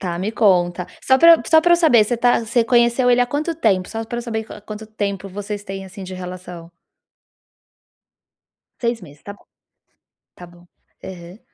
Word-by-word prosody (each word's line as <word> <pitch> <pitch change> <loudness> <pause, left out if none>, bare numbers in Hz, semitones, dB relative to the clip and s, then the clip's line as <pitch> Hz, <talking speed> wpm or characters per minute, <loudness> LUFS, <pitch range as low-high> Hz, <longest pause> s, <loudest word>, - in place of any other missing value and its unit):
Tá, 175 -2 -4
me 195 +4 -2
conta. 180 -5 +1 0.2
Só 265 0 +3
pra 335 +2 +8
eu - - -3
só 320 -1 +5
pra 345 +1 +3
eu - - +6
saber, 300 -11 +4
você 240 +3 -2
tá 245 0 +2
você 230 +1 0
conheceu 240 +1 +2
ele 245 0 +3
há 245 - +2
quanto 300 +6 -3
tempo? 195 - 0
Só 225 0 -5
para 235 +2 -6
eu - - -4
saber 225 -2 -4
a - - -8
a - - -16
quanto 215 +1 -9
tempo 200 -2 -4
vocês 205 +1 -6
têm, 195 0 -7
assim, 190 +1 -10
de 185 0 -8
relação. 180 -2 -9 2.1
6 235 -1 -1
meses, 145 -3 -15
tá 200 - -8
bom. 205 - -21 0.9
Tá 175 - -12
bom. 175 0 -19 0.4
Aham. 180 +1 -10
210 Hz, 200 wpm, -20 LUFS, 185-240 Hz, 2.1 s, pra